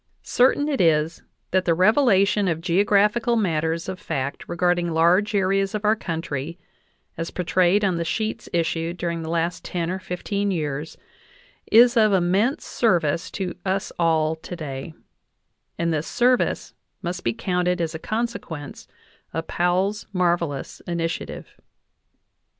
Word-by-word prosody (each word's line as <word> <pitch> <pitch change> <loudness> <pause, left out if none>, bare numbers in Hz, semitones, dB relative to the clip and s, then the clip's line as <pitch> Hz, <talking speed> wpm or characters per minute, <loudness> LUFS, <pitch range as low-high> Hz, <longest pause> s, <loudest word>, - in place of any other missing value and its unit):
Certain 265 +4 +3
it 280 -7 0
is 160 -1 +2 0.3
that 185 0 +2
the 170 - +3
revelation 200 - +4
of 165 -3 0
geographical 205 +6 +2
matters 165 -5 0
of 190 -1 -5
fact 140 -8 -3
regarding 175 0 +1
large 175 +6 +3
areas 195 +1 +1
of 210 0 -3
our 215 +1 +4
country, 165 -4 -4 0.6
as 165 - -2
portrayed 185 +3 +2
on 185 -3 +1
the 170 - -1
sheets 215 +6 -3
issued 165 0 -1
during 170 -1 -2
the 160 - -5
last 170 +1 -1
ten 170 -1 -2
or 190 - -3
fifteen 200 +3 -2
years, 150 -4 -3 0.7
is 240 +3 +7
of 215 -3 +4
immense 195 - +1
service 170 -8 +1
to 190 -3 -4
us 190 0 -1
all 160 -2 +2
today; 160 -3 -7 0.8
and 170 -1 0
this 155 0 -2
service 250 +1 +1 0.3
must 180 +1 -4
be 115 - +1
counted 180 - -1
as 165 -1 -1
a 160 - -5
consequence 215 -9 -4 0.5
of 165 0 -2
Powell's 185 +4 0
marvelous 170 -6 -1
initiative. 165 -1 -4
175 Hz, 135 wpm, -23 LUFS, 165-200 Hz, 0.8 s, is